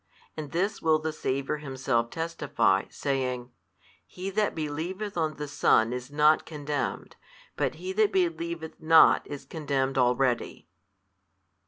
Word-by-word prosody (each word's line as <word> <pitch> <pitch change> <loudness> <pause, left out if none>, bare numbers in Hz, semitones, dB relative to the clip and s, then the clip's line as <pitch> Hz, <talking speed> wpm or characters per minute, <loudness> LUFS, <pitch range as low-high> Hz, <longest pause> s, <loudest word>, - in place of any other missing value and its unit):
And 155 -2 -6
this 195 +5 -1
will 160 -1 +4
the 155 0 -3
Saviour 140 0 -2
Himself 130 -5 -1
testify, 165 +3 0
saying, 130 -3 -2 0.6
He 185 +2 -6
that 210 +1 0
believeth 165 +7 -4
on 160 -2 -1
the 150 - -5
Son 120 -5 +3
is 125 +1 -5
not 150 +1 +4
condemned, 145 -2 -4 0.4
but - - -1
he 185 +4 -5
that 215 +1 +3
believeth 170 -2 -2
not 160 0 +6
is 145 -1 -7
condemned 135 -4 -1
already. 125 -3 +1
150 Hz, 130 wpm, -27 LUFS, 135-165 Hz, 0.6 s, not